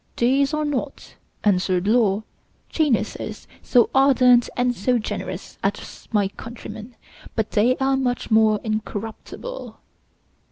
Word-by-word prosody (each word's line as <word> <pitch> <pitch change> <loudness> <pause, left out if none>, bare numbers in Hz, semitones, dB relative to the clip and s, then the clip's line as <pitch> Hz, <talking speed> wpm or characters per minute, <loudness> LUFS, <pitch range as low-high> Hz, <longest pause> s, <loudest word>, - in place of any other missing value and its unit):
"These 270 +4 +3
are 305 -1 -1
not," 290 -1 -4 0.3
answered 185 -2 +2
Law, 215 -2 +3 0.5
"geniuses 295 -8 -1 0.2
so 245 -3 +3
ardent 255 -3 +5
and 245 0 +2
so 245 +3 +1
generous 220 - -5
as - - -4
my 205 -3 +2
countrymen; 225 +2 -9 0.4
but 220 -2 -1
they 235 +5 +3
are 270 0 +2
much 245 -3 -2
more 220 -1 +4
incorruptible." 220 - -5
240 Hz, 115 wpm, -22 LUFS, 215-265 Hz, 0.5 s, ardent